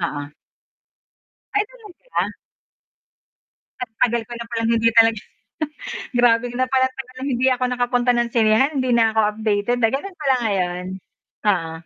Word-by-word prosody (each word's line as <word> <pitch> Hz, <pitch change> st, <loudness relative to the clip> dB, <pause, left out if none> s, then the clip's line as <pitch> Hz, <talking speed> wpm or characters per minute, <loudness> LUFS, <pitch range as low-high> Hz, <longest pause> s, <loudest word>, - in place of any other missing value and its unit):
Oo. 145 Hz, -4 st, -4 dB, 1.2 s
Ay, 415 Hz, 0 st, +3 dB
talaga? 485 Hz, -1 st, -5 dB, 1.5 s
Ang 250 Hz, -3 st, -4 dB
tagal 235 Hz, -1 st, +3 dB
ko -, -, -9 dB
na 235 Hz, 0 st, -7 dB
palang 230 Hz, -1 st, -1 dB
hindi 230 Hz, 0 st, +3 dB
talaga 225 Hz, -2 st, +5 dB, 0.9 s
grabe 240 Hz, -1 st, +4 dB
na 255 Hz, +1 st, +1 dB
pala. 260 Hz, 0 st, +3 dB
Talagang 255 Hz, +1 st, -8 dB
hindi 250 Hz, +2 st, +1 dB
ako 255 Hz, 0 st, 0 dB
nakapunta 245 Hz, 0 st, +1 dB
ng 240 Hz, 0 st, +1 dB
sinehan, 225 Hz, +5 st, +4 dB
hindi 255 Hz, -1 st, 0 dB
na 225 Hz, -1 st, +4 dB
ako 220 Hz, -, +4 dB, 0.2 s
updated 215 Hz, +2 st, 0 dB
na 225 Hz, -, +4 dB
gano'n 365 Hz, +6 st, -4 dB
pala 270 Hz, -3 st, +3 dB
ngayon. 180 Hz, -4 st, -1 dB, 0.6 s
Oo. 165 Hz, -5 st, +1 dB
235 Hz, 140 wpm, -21 LUFS, 220-255 Hz, 1.5 s, talaga